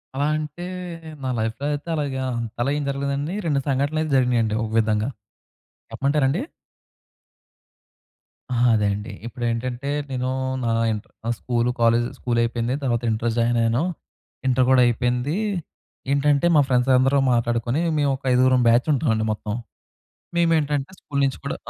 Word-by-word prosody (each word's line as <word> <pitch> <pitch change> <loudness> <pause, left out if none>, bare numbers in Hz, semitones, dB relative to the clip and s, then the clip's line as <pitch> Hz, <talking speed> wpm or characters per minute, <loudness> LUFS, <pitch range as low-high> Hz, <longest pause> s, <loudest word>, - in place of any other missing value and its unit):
అలా 140 +2 +1
అంటే, 155 +3 -6 0.6
నా 130 - -1
లైఫ్‌లో 110 +5 -2
అయితే 145 +3 -5
అలాగా 140 -3 -2 0.4
అలా 125 - +1
ఏం 150 - -2
జరగలేదండి. 140 +4 -2
2 145 -4 +2
సంఘటనలు 140 +3 0
అయితే 155 -1 -2
జరిగినాయండి 120 -4 +2
ఒక 110 - -4
విధంగా. 110 +1 +1 0.8
చెప్పమంటారా 140 0 +1
అండి? 160 - 0 2.1
ఆ! - - 0 0.2
అదే 105 -2 +2
అండి. 105 +3 -5
ఇప్పుడేంటంటే 120 +2 -3 0.2
నేను 130 0 -1 0.3
నా 115 - 0 0.2
ఇంటర్ 105 0 -7 0.2
ఆహ్, 120 - +2
స్కూల్, 120 -1 0
కాలేజ్ 115 +1 +4
స్కూల్ 120 -1 -1
అయిపోయింది. 120 +2 -1
తర్వాత 120 -2 0
ఇంటర్ 115 +1 0
జాయిన్ 120 0 +2
అయ్యాను. 115 +5 +2 0.6
ఇంటర్ 130 0 +3
కూడా 130 -1 +6
అయిపోయింది. 125 +5 0 0.8
ఏంటంటే 140 +2 +3
మా 150 - +7
ఫ్రెండ్స్ 125 0 +2
అందరూ 135 +2 +3 0.2
మాట్లాడుకొని 120 +4 0 0.2
మేము 145 -1 +2
ఒక 135 - -14
ఐదుగురం 130 0 +4
బ్యాచ్ 120 +4 +4
ఉంటామండి 115 -6 +1
మొత్తం. 105 0 -4 0.8
మేమేంటంటే 155 -4 +1
స్కూల్ 140 -1 -3
నుంచి 135 -2 -1
కూడా - - -3
125 Hz, 140 wpm, -23 LUFS, 115-140 Hz, 2.1 s, మా